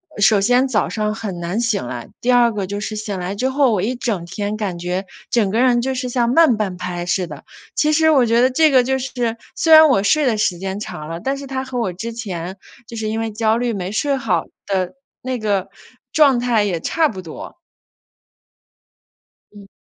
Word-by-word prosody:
呃， - - -6
首 205 0 +5
先 245 +5 +3
早 225 -5 0
上 215 -1 -2
很 210 -6 -5
难 175 +5 -2
醒 220 - -1
来， 120 -1 -7
第 250 - +2
二 240 -2 +4
个 200 -3 -3
就 205 +2 -4
是 215 +1 -4
醒 210 -2 -4
来 180 +2 -3
之 255 +6 0
后， 270 -1 +3
我 205 -4 +1
一 235 +6 -1
整 220 -8 -2
天 205 +4 -4
感 200 -5 -3
觉 180 +2 -3 0.3
整 220 -5 +2
个 220 +4 0
人 245 -2 +3
就 265 +2 -2
是 255 0 -3
像 240 -1 +1
慢 310 -3 +5
半 195 -4 -2
拍 180 -1 -4
似 180 +1 0
的。 - - -10 0.3
其 305 - +2
实 315 +1 +4
我 270 -5 +4
觉 230 +1 +3
得 255 - +4
这 315 +4 +4
个 260 -2 +5
就 265 +1 0
是 245 -3 -2 0.2
虽 325 -1 +3
然 315 0 +10
我 195 -8 +3
睡 300 +8 +3
的 225 -3 +1
时 180 -4 0
间 190 +1 -4
长 155 -7 -7
了， 165 0 -5
但 270 +8 -2
是 280 - -8
它 265 0 -3
和 260 -2 -4
我 225 -6 -1
之 230 +6 -6
前 190 -5 -5 0.3
就 230 - -9
是 220 -1 -3
因 220 +1 -2
为 225 0 -2
焦 220 +1 +1
虑 240 -1 -1
没 190 -2 -4
睡 280 +6 0
好 265 - 0 0.2
的 185 -2 -1 0.3
那 255 -1 -3
个 200 -3 -1 0.4
状 280 -5 +5
态 240 -3 +2
也 185 -5 -1
差 320 - +1
不 190 - -7
多。 160 - -9 2.0
嗯。 205 -1 -13
220 Hz, 240 characters per minute, -19 LUFS, 195-255 Hz, 2.0 s, 然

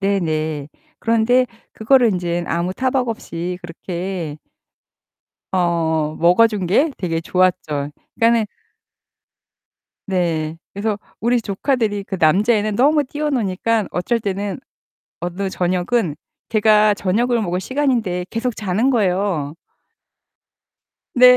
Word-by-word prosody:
네네. 155 -7 -1 0.3
그런데 230 +3 +3 0.3
그거를 245 +2 +4
인제 175 -1 -1
아무 170 +2 -1
타박 260 0 0
없이 180 -5 -4
그렇게 175 -2 -5 1.1
어 165 -4 +1
먹어 180 +7 +6
준 210 -5 -3
게 280 - +3
되게 165 -3 -2
좋았죠. 160 -5 0 0.2
그러니까는 230 -1 +3 1.6
네. 165 -4 -1 0.2
그래서 205 +1 -1 0.2
우리 240 +2 +2
조카들이 210 -1 -1
그 195 - -4
남자애는 210 +6 +3
너무 290 +3 +4
뛰어 295 +3 -3
노니깐 220 -3 0
어쩔 205 +7 0
때는 200 0 -3 0.6
어느 180 +3 -3
저녁은 180 0 0 0.3
걔가 215 -1 +4
저녁을 230 +6 +1
먹을 180 -2 -1
시간인데 235 -9 0
계속 230 +1 -2
자는 210 +5 0
거예요. 185 - 0 1.6
네. 250 0 +8
200 Hz, 235 characters per minute, -20 LUFS, 175-230 Hz, 1.6 s, 네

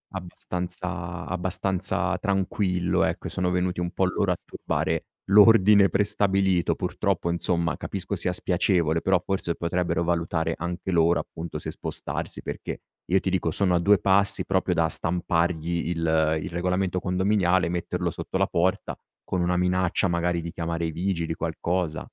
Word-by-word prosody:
abbastanza 90 -1 -5
abbastanza 90 +1 -1
tranquillo, 95 -2 0
ecco, - - -2
sono 90 -2 -1
venuti 90 0 0
un 85 0 -2
po' 95 - +1
loro 90 - 0
a - - -7
turbare - - -2 0.2
l'ordine 105 -1 +7
prestabilito. 95 -2 +1
Purtroppo, 85 - -1
insomma, 85 0 0
capisco 100 +1 -4
sia 90 +1 0
spiacevole, 85 -3 +1
però 95 -2 +2
forse 95 -3 -1
potrebbero 85 0 -1
valutare 85 -1 0
anche 85 +2 -4
loro, 85 0 +3
appunto, 85 +1 -7
se - - -5
spostarsi, - - -5
perché - - -6 0.2
io 95 +2 +3
ti 95 - -1
dico 90 -3 0
sono 90 0 +2
a - - +3
2 100 +2 +4
passi 100 +1 +2
proprio - - +1
da - - +3
stampargli 85 -1 0
il 80 -2 +1
il 95 - -5
regolamento 90 +1 -1
condominiale, 95 -1 +2
metterlo 85 -1 -2
sotto - - -4
la - - +2
porta, 90 +2 0 0.3
con 95 - -2
una 90 +1 +1
minaccia 90 +1 +1
magari 85 0 0
di 85 0 -6
chiamare 85 -1 -3
i 80 - -2
vigili, 85 -1 -2
qualcosa. 85 0 -2
90 Hz, 150 wpm, -25 LUFS, 85-95 Hz, 0.3 s, l'ordine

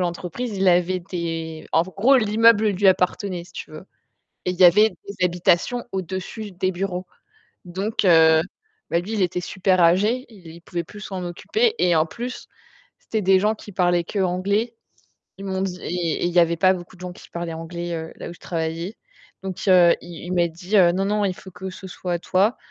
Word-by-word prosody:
l'entreprise, 180 +6 -3
il 190 - 0
avait 180 +1 +3
des 165 -3 -5
en 160 - +4
gros, 200 +9 +3
l'immeuble 220 -1 +4
lui 200 0 +1
appartenait 180 -1 0
si 175 - -19
tu - - -8
veux. 155 +3 -10 0.6
Et - - 0
il 180 - -4
y - - +9
avait 210 +5 +7
des 200 -3 -5
habitations 180 +7 +1
au-dessus 190 +3 -5
des 185 +1 -1
bureaux. 185 0 -4 0.6
Donc, 195 +5 -3
heu, 160 -3 +6 0.5
bah, 170 - +2
lui, 195 +5 -7
il 215 -3 0
était 180 0 0
super 185 +1 +1
âgé, 205 +10 +3
il 170 -6 -13
pouvait 170 0 -4
plus 210 +6 -12
s'en 190 -3 -5
occuper 435 - 0
et 175 -2 +3
en 155 - +4
plus, 240 +8 -7 0.5
c'était 220 -1 -3
des 190 0 +5
gens 210 +2 +2
qui 210 -1 -12
parlaient 175 -2 +2
qu'anglais. 200 +5 -1 0.6
Ils 195 - -8
m'ont 190 -1 -2
dit 185 -2 -3
et 170 -2 -2
et - - +2
il 175 - 0
y 175 - +5
avait 170 0 +3
pas 185 +3 +4
beaucoup 175 0 -9
de 180 - -17
gens 180 -1 -6
qui - - -15
parlaient 170 -1 -5
anglais, 170 +1 -5
heu, 160 -1 -5
là - - -8
où - - -8
je - - -18
travaillais. 165 +4 -4 0.5
Donc, 190 +1 -5
il 180 -2 +6
il 175 +1 -8
m'a 175 -1 +3
dit: 175 +5 -4 0.2
«Non 195 +1 0
non, 210 +1 0
il 190 - 0
faut 190 - -13
que 185 +1 -7
ce 190 +1 -10
soit 180 -1 -4
toi, 195 +7 +1
180 Hz, 200 wpm, -22 LUFS, 175-200 Hz, 0.6 s, y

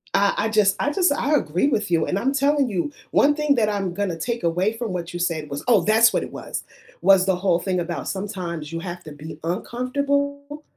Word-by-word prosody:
I 200 0 +3
I 220 +2 +1
just 210 -3 +3
I 290 - +1
just 365 0 +2
I 290 +1 +1
agree 175 - 0
with 210 -9 -1
you, 165 -1 +3
and 185 - 0
I'm 265 +6 0
telling 280 0 +2
you, 200 +8 -2 0.2
1 290 +1 +4
thing 300 -2 +2
that 220 -4 +2
I'm 195 -4 -2
gonna 185 -3 -2
take 235 +4 -3
away 180 +5 +1
from 230 -5 -3
what 175 -1 -5
you 175 - -4
said 160 -4 -2
was 140 0 -5
oh, 220 -7 +5
that's 225 +4 +5
what - - +1
it - - -8
was- - - -5 0.4
was 190 0 +5
the 190 -1 +2
whole 180 -2 +1
thing 185 0 -1
about 170 -1 -4
sometimes 175 -6 -5
you 165 - -2
have 175 0 -7
to 155 - -8
be 150 +1 -9
uncomfortable 280 - -2
200 Hz, 230 wpm, -23 LUFS, 175-255 Hz, 0.4 s, oh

